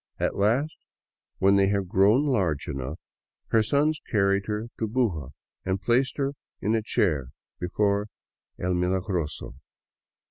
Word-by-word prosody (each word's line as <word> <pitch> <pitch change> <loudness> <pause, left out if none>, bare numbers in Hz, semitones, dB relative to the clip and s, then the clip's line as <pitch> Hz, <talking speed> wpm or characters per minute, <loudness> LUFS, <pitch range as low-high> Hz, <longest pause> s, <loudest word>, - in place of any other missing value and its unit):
At - - 0
last, 120 +10 +2 0.6
when 100 +1 +4
they 100 0 +4
had 100 -1 0
grown 100 +10 +4
large 95 - 0
enough, 65 +4 -4 0.5
her 115 - +4
sons 145 +7 +1
carried 100 -2 +2
her 110 +2 -3
to 110 - 0
Buga 105 - 0 0.3
and 95 +1 -1
placed 125 +5 +1
her 140 -1 0 0.3
in 105 +3 0
a 115 - +2
chair 80 - +1 0.3
before 100 +3 +1 0.5
El 90 +1 -1
Milagroso. 90 - -2
100 Hz, 135 wpm, -26 LUFS, 90-115 Hz, 0.6 s, when